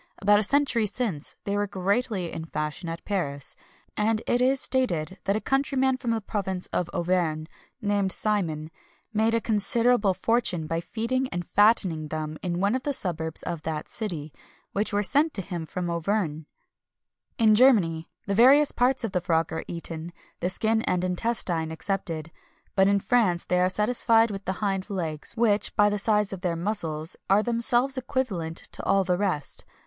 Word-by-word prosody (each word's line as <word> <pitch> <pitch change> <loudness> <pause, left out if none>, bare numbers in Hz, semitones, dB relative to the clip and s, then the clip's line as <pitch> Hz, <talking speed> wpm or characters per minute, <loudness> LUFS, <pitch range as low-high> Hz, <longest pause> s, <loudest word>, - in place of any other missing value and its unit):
About 205 +2 +4
a - - +1
century 255 -2 +2
since, 205 - -3
they 200 - -2
were 205 0 0
greatly 195 -1 -1
in 160 - -5
fashion 150 +1 -4
at 165 0 -7
Paris; 145 -9 -2 0.4
and 215 +1 +1
it 245 - +1
is 265 +2 +4
stated 190 -11 +1
that 195 - +1
a - - 0
countryman 265 0 +1
from 250 -2 -4
the 225 -1 0
province 190 -3 -3
of 175 -1 0
Auvergne, 170 -3 0 0.4
named 205 -2 +1
Simon, 165 -9 0 0.4
made 220 +1 +2
a - - +3
considerable 220 -1 +2
fortune 220 -9 +1
by 165 +1 -2
feeding 255 +7 -2
and 175 -1 -4
fattening 195 -7 +3
them 155 0 -5
in 175 -1 -2
one 200 +3 +2
of 260 - -1
the 285 +2 -2
suburbs 165 - -2
of 170 -3 -4
that 155 -1 -4
city, 165 -9 -4 0.4
which 210 +2 -1
were 205 0 +1
sent 290 +9 +2
to 195 - +1
him 170 -3 -5
from 180 +1 -4
Auvergne. 170 -2 -1 0.9
"In 220 -2 +5
Germany, 200 -10 +4 0.2
the 200 - -1
various 270 +7 +6
parts 250 +1 +1
of 225 - -2
the 180 -2 0
frog 165 -2 0
are 160 - -3
eaten, 170 0 -5 0.3
the 180 - -1
skin 220 +3 +1
and 180 -4 0
intestine 180 -4 -1
excepted; 165 -3 -3 0.4
but 190 0 +4
in 200 0 +3
France 195 -6 +1
they 180 - +1
are 180 0 +3
satisfied 225 +2 +3
with 195 -1 -7
the 190 - -1
hind 195 0 -2
legs, 165 -6 -3
which, 215 -3 +2
by 210 -1 +5
the 205 - 0
size 210 -1 +2
of 190 - -7
their 175 -3 -1
muscles, 165 -4 -2
are 200 +2 +4
themselves 240 +3 +1
equivalent 195 -11 -3
to - - -3
all 195 0 +3
the 180 -1 +1
rest. 180 -8 -1
195 Hz, 175 wpm, -26 LUFS, 170-225 Hz, 0.9 s, various